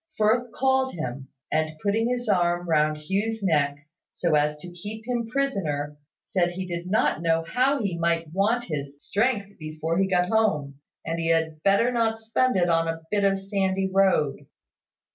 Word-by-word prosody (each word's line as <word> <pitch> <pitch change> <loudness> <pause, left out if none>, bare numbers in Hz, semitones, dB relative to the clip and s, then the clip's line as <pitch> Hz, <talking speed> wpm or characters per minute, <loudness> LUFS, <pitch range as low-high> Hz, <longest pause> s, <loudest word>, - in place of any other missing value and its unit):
Firth 225 +3 +2
called 265 -1 +1
him, 135 -3 -5 0.2
and 155 0 0
putting 215 +7 0
his 245 -1 -2
arm 175 -3 +1
round 155 -1 +2
Hugh's 200 +8 -2
neck, 145 -4 +1 0.2
so 170 -3 -1
as 150 0 +2
to 175 +4 -10
keep 210 +5 -8
him 240 -2 -1
prisoner, 180 - -1 0.3
said 175 -2 +1
he 185 +1 -4
did 175 0 -5
not 190 -5 +2
know 165 -1 +2
how 255 +8 +1
he 180 -4 -2
might 165 -1 0
want 215 +6 +2
his 140 -6 -5
strength 205 - -1
before 155 +2 -2
he 195 - +3
got 180 -2 +2
home, 150 -11 +1 0.3
and 165 +1 -2
he 165 - -1
had 160 -1 +1
better 200 +6 +3
not 225 -2 +1
spend 225 +3 +1
it 175 -2 +3
on 165 -1 +2
a 165 0 -4
bit 205 -1 +1
of 195 0 +3
sandy 195 -1 -1
road. 190 -7 +2
180 Hz, 175 wpm, -25 LUFS, 160-220 Hz, 0.3 s, he